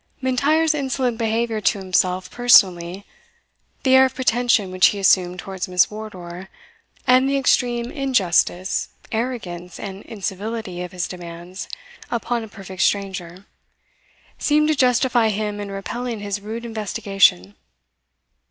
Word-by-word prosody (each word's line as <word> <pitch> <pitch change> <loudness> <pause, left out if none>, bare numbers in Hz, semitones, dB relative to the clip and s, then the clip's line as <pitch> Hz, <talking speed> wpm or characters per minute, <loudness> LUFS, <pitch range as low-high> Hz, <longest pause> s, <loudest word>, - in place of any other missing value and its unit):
M'Intyre's 295 +5 +2
insolent 260 -4 -1
behaviour 225 0 0
to 205 - +2
himself 185 -1 0
personally, 190 -6 +4 0.8
the 260 - +3
air 260 0 +8
of 260 0 -3
pretension 240 -6 +2
which 185 0 +5
he 205 - -1
assumed 185 -2 +3
towards 190 0 -5
Miss 180 +1 +3
Wardour, 190 -4 -8 0.6
and 255 +2 +4
the 275 - +1
extreme 240 -2 +1
injustice, 190 - +1 0.2
arrogance, 205 -8 -4
and 195 -1 -7
incivility 205 -2 -5
of 180 -1 -6
his 180 -1 -3
demands 175 +1 -8 0.4
upon 235 0 -2
a - - -8
perfect 195 -3 -8
stranger, 190 -2 -1 0.9
seemed 300 +1 +2
to 310 - +3
justify 250 -3 +3
him 210 0 -2
in 205 -1 -5
repelling 230 +4 -4
his 205 0 -4
rude 225 +3 -6
investigation. 195 - +1
210 Hz, 125 wpm, -21 LUFS, 185-245 Hz, 0.9 s, air